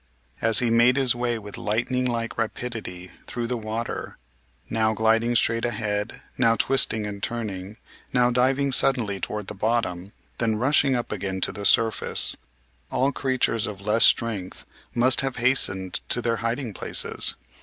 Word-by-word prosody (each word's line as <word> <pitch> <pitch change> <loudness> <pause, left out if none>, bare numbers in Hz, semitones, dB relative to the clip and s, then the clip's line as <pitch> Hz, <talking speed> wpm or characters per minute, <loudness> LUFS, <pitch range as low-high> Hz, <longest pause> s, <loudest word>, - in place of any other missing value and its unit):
As 115 0 +3
he 120 -2 +2
made 120 +2 +5
his 130 -3 +3
way 120 -1 -1
with 105 -2 -9
lightning 120 +4 -1
like 115 -2 -2
rapidity 110 -6 -5 0.2
through 120 -1 -4
the 125 +1 -2
water, 115 +1 -5 0.5
now 110 -1 +1
gliding 115 +2 +2
straight 115 0 +1
ahead, 105 -2 -3 0.2
now 115 -2 +4
twisting 115 -4 +2
and 100 -1 -6
turning, 105 -3 -5 0.3
now 125 -1 +3
diving 135 +3 +2
suddenly 115 -7 +2
toward 105 +3 -4
the - - -6
bottom, 100 -3 -2 0.3
then 115 -2 +1
rushing 135 +3 +3
up 120 - -3
again 95 -2 -3
to - - +1
the 100 - -6
surface, 115 +1 +3 0.5
all 135 +2 +1
creatures 130 -5 0
of 105 -3 -7
less 110 +2 +3
strength 105 -6 +1 0.3
must 125 +2 +4
have 135 -2 -2
hastened 95 -7 +1
to - - +5
their 115 -1 -1
hiding 115 0 -3
places. - - 0
115 Hz, 155 wpm, -24 LUFS, 105-125 Hz, 0.5 s, made